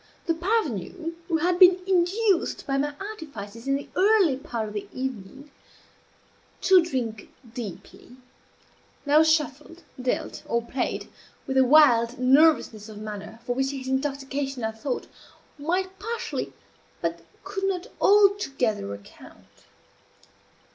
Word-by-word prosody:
The 330 - +2
parvenu, 330 - -2
who 330 - +1
had 350 +2 +1
been 365 -1 +8
induced, 385 +2 +1
by 275 -1 0
my 290 +1 -1
artifices 275 - -8
in 275 - +2
the 280 - -5
early 390 -7 +4
part 240 -6 -4
of 210 - -8
the 205 -1 -5
evening, 265 +2 -6 1.1
to 375 -1 +6
drink 240 - -4 0.2
deeply, 235 +1 -9 0.9
now 295 +2 +5
shuffled, 315 +1 0 0.2
dealt, 250 0 -2
or 235 0 0
played, 250 +2 -3 0.4
with 265 - -3
a 265 - +6
wild 250 -4 +5
nervousness 255 -5 +3
of 215 - -10
manner 215 +1 -8
for 245 - 0
which 270 +2 0
his 270 -2 -6
intoxication, 270 -1 -2
I 220 - 0
thought, 235 +4 -4 0.5
might 370 +5 -2
partially 455 +3 -4 0.5
but 170 0 -3 0.2
could 390 0 -3
not 380 -1 -1 0.2
altogether 275 - +3
account. 100 - -17
275 Hz, 125 wpm, -25 LUFS, 235-350 Hz, 1.1 s, been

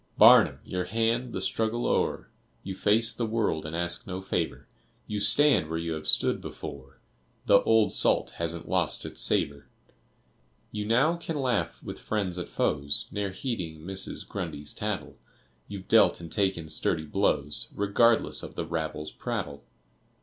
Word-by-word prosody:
Barnum, - - +7
your 90 -1 -3
hand! 115 +2 0
The - - -3
struggle 115 +2 -1
o'er, - - 0 0.4
You 95 - -5
face 110 +4 +2
the 115 0 -2
world 105 -9 -1
and 80 - -5
ask 85 0 -3
no 90 -1 -4
favor; 90 -3 -3 0.4
You 105 -1 -3
stand 105 - +4
where 80 - -2
you 85 0 -3
have 80 -1 -5
stood - - +2
before, 70 -1 -9 0.5
The 100 - +6
old 110 -1 +3
salt - - +3
hasn't 85 0 -3
lost 90 -3 0
its - - -1
savor. 70 0 0 1.0
You 105 -1 -4
now 135 +9 +3
can 165 -1 -5
laugh 125 -5 -1
with - - -7
friends, 95 -5 -2
at 90 - -6
foes, 70 0 -1
Ne'er 100 -1 -2
heeding 95 - -5
Mrs. 95 +3 -4
Grundy's 75 0 -5
tattle; - - -4 0.5
You've 100 -2 -8
dealt - - +5
and 85 -1 -9
taken 95 -6 0
sturdy 80 0 0
blows, 75 -1 0
Regardless 110 +3 +3
of - - -9
the 85 - -3
rabble's 80 -2 -4
prattle. 70 0 -5
95 Hz, 155 wpm, -27 LUFS, 80-110 Hz, 1.0 s, Barnum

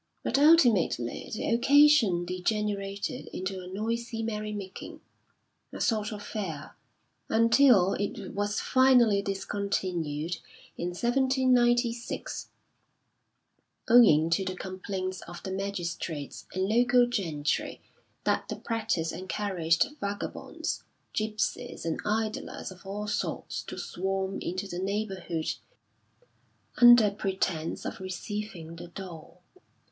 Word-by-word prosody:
But 265 - +1
ultimately 240 - +4
the 215 - -3
occasion 240 -7 +5
degenerated 200 +4 -2
into 185 0 -4
a 180 - -9
noisy 225 +4 -3
merry 215 -1 -3
making, 200 -3 -7 0.7
a - - -8
sort 215 -2 0
of 205 -1 -6
fair, 170 -9 -5 0.5
until 230 -4 +5
it 205 - -4
was 205 +1 -1
finally 250 -6 +4
discontinued 185 -5 -2 0.4
in 175 - -3
1796, 240 +2 +1 1.4
owing 165 -10 +6
to 180 +4 +2
the 185 0 -3
complaints 185 0 -4
of 175 0 -9
the 190 - -4
magistrates 175 -6 -4
and 190 +1 -1
local 245 +3 +4
gentry 165 -11 -2 0.4
that - - 0
the - - -2
practice 215 -8 -1
encouraged 185 - 0
vagabonds, 200 0 -4 0.3
gipsies 215 +2 -2
and 165 - -2
idlers 215 -1 -2
of 185 +1 -13
all 205 +2 -4
sorts 210 - -3
to - - -8
swarm 190 +1 -2
into 185 +3 -3
the 175 -2 -5
neighbourhood 190 -4 -2 1.2
under 240 -4 +8
pretence 190 -5 -2
of - - -5
receiving 185 -2 -6
the 175 +1 -8
dole. 180 -1 -10
200 Hz, 105 wpm, -28 LUFS, 180-225 Hz, 1.4 s, under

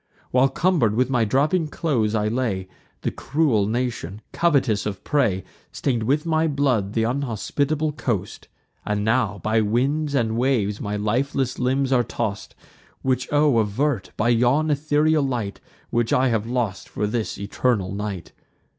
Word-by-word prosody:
While, 130 +2 +4
cumber'd 140 - +2
with 125 +2 +1
my 120 -4 +2
dropping 155 - +2
clothes, 120 -9 0
I 105 -1 +1
lay, 110 -5 -1 0.3
The - - -1
cruel 135 -9 +1
nation, 115 -4 -3
covetous 135 - +2
of 100 -3 -5
prey, 115 -11 +1 0.3
Stain'd 125 -4 -1
with 140 +8 +1
my 160 0 +2
blood 130 -9 0
th' 115 - +2
unhospitable 140 +5 -1
coast; 120 -8 -3 0.4
And 105 0 -1
now, 110 -3 +1
by 110 +1 +2
winds 140 +7 0
and 115 -4 +1
waves, 115 -5 +1
my 105 -1 -3
lifeless 125 +5 -1
limbs 130 +1 +1
are 125 - +4
toss'd: 110 -3 -4 0.5
Which 130 -1 0
O 145 -4 +4
avert, 110 +1 0
by 110 +2 +2
yon 125 +7 +3
ethereal 150 +1 +2
light, 120 -7 -2 0.3
Which 120 -1 +1
I 130 0 +3
have 115 -2 0
lost 120 -6 -2
for 105 - -2
this 110 +1 -2
eternal 100 -1 0
night! 100 -3 -5
120 Hz, 150 wpm, -23 LUFS, 105-140 Hz, 0.5 s, While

